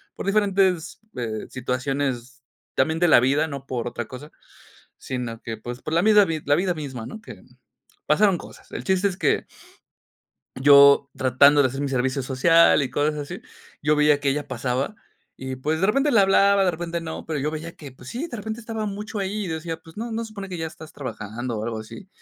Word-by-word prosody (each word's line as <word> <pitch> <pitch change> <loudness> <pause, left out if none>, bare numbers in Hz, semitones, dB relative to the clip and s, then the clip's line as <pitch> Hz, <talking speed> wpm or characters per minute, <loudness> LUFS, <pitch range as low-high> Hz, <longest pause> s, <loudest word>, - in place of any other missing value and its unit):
por - - -6
diferentes, 195 -4 +1 0.2
eh, 110 -3 -4
situaciones 130 0 -3 0.3
también 160 +5 +1
de 175 - +4
la - - +8
vida, 140 +5 +2
no 140 -3 -7
por 120 -3 -3
otra 120 -1 -4
cosa, 145 +4 -10 0.7
sino 120 -3 -5
que, 115 -1 -6
pues, 120 +3 -8
por 155 - -5
la 165 - +3
misma 210 -1 +6
la - - +4
vid 160 -3 -3
la 145 - +4
vida 180 +2 +1
misma, 135 -7 -6
¿no?, 220 - -9
que, - - -11 0.6
pasaron 200 -4 +3
cosas, - - -14
el - - -5
chiste 190 +1 +2
es 190 - -3
que. - - +1 1.2
Yo 140 0 +7
tratando 140 +3 +5
de - - +4
hacer 135 +2 -5
mi 145 - -1
servicio 130 +1 0
social 155 +7 +4
y 135 - -1
cosas 145 +4 0
así, 150 +5 -6 0.4
yo 150 +1 +3
veía 150 -1 +4
que 140 - 0
ella 145 +1 -1
pasaba 130 - -2 0.4
y, 130 0 -5
pues, 155 +5 -1
de 190 - +3
repente 275 +6 +2
le 225 - +6
hablaba, 195 0 +4
de 185 - +3
repente 170 0 -4
no, 160 -1 -7
pero 155 -3 -2
yo 150 +3 -1
veía 160 +2 -6
que, 145 -3 -11
pues, 130 0 -14
sí, 285 +8 -4
de 245 - -6
repente 220 +2 -5
estaba 225 -1 -4
mucho 210 +2 -5
ahí 200 +1 -2
y - - -5
decía, 160 0 -4
pues: 160 0 -16
"No, 230 +2 -4
¿no 225 - -2
se 225 - -7
supone 200 -2 -8
que 180 - -5
ya 160 -1 -3
estás 160 -1 -13
trabajando 120 -3 -5
o 105 - -3
algo 115 -1 -3
así?", 185 - -11
150 Hz, 215 wpm, -24 LUFS, 130-190 Hz, 1.2 s, la